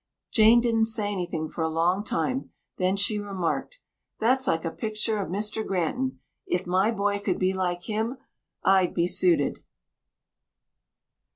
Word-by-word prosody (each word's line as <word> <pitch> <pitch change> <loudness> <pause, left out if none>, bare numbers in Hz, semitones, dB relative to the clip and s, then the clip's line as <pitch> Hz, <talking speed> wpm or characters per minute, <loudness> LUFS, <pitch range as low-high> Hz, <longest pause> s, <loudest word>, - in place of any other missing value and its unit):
Jane 225 +2 +6
didn't 225 -2 +2
say 215 -2 -1
anything 175 -5 -3
for 165 - -6
a 160 - +1
long 175 +5 +1
time, 255 +5 -1 0.3
then 185 +1 +1
she 210 +1 +2
remarked, 200 - -3 0.4
"That's 255 +3 +2
like 165 +1 +1
a 165 - -1
pictur 215 +1 -2
of 195 - -3
Mr. 210 +3 -2
Granton. 195 +8 -1 0.3
If 360 - -1
my 185 +4 +2
boy 205 -2 0
could 200 -3 -1
be 185 0 +1
like 180 -2 -2
him, 220 +5 -2 0.5
I'd 190 -2 +3
be 170 - +2
suited." 180 -4 +2
200 Hz, 150 wpm, -26 LUFS, 180-220 Hz, 0.5 s, Jane